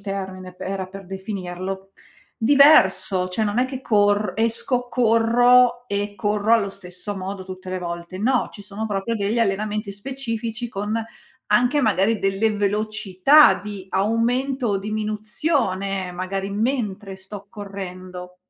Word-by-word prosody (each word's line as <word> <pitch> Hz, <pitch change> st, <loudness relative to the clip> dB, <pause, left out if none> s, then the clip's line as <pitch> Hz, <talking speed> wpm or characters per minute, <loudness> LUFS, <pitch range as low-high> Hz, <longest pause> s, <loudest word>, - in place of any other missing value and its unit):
termine, 190 Hz, -2 st, -6 dB
p -, -, -30 dB
era 190 Hz, 0 st, -3 dB
per 195 Hz, -1 st, -10 dB
definirlo, 190 Hz, 0 st, -6 dB, 0.4 s
diverso. 200 Hz, -9 st, +5 dB
Cioè 215 Hz, +4 st, -1 dB
non 205 Hz, +3 st, -1 dB
è 250 Hz, -, +4 dB
che 260 Hz, 0 st, -6 dB
corr 205 Hz, -3 st, +2 dB
esco, 230 Hz, +3 st, 0 dB
corro 245 Hz, +1 st, +4 dB
e 205 Hz, -1 st, -2 dB
corro 210 Hz, +2 st, 0 dB
allo 210 Hz, -4 st, +3 dB
stesso 185 Hz, +1 st, -6 dB
modo 190 Hz, 0 st, -5 dB
tutte 185 Hz, 0 st, -9 dB
le 185 Hz, -, -2 dB
volte. 170 Hz, +1 st, -6 dB
No, 250 Hz, +5 st, +1 dB
ci 205 Hz, -, -10 dB
sono 210 Hz, +2 st, -5 dB
proprio 205 Hz, +2 st, -2 dB
degli 210 Hz, +2 st, -1 dB
allenamenti 210 Hz, 0 st, -1 dB
specifici 230 Hz, 0 st, -4 dB
con 210 Hz, 0 st, -3 dB, 0.6 s
anche 245 Hz, +6 st, +3 dB
magari 220 Hz, -1 st, +2 dB
delle 195 Hz, +3 st, +1 dB
velocità 215 Hz, +6 st, +4 dB
di 205 Hz, -2 st, -7 dB
aumento 240 Hz, +6 st, 0 dB
o 200 Hz, -2 st, +1 dB
diminuzione, 210 Hz, -, -1 dB
magari 190 Hz, +2 st, -3 dB
mentre 205 Hz, -3 st, -2 dB
sto 195 Hz, +1 st, -10 dB
correndo. 185 Hz, -3 st, -8 dB
205 Hz, 135 wpm, -22 LUFS, 190-230 Hz, 0.6 s, diverso